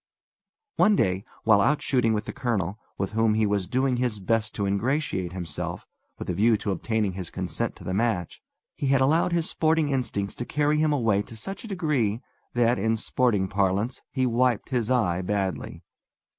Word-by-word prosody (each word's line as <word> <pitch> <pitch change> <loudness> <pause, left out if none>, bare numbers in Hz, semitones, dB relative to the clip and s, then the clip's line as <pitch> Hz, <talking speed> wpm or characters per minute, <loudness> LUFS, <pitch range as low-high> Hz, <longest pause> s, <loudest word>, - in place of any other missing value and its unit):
One 210 0 +5
day 95 - +1 0.2
while 105 -2 +5
out 150 +8 +3
shooting 125 -4 +2
with 105 -1 -1
the - - -5
colonel, 110 -5 -2 0.2
with 95 - -2
whom 110 0 +2
he 110 0 +3
was 100 -3 0
doing 130 0 +1
his 120 -4 -1
best 110 +2 0
to 100 - -1
ingratiate 100 - -1
himself, 85 -5 -5 0.3
with - - -7
a 90 - -1
view 110 +5 +3
to 100 - -3
obtaining 105 +2 0
his 90 -2 -5
consent - - -3
to - - -13
the 95 - -3
match, 100 -5 -1 0.3
he 140 - -3
had 135 0 +4
allowed 160 +6 +3
his 170 -1 +1
sporting 160 -1 +1
instincts 120 -7 -1
to - - -2
carry 150 +2 +1
him 155 -1 +3
away 115 -8 +2
to 115 - -10
such 195 - -6
a - - -7
degree 150 - 0 0.4
that, 120 -2 +3
in 110 +3 +1
sporting 110 -4 +1
parlance, 100 +5 0
he 130 -2 0
wiped 125 -1 +1
his 120 -4 0
eye 100 -9 +2
badly. 95 -5 -3
110 Hz, 185 wpm, -26 LUFS, 100-130 Hz, 0.4 s, One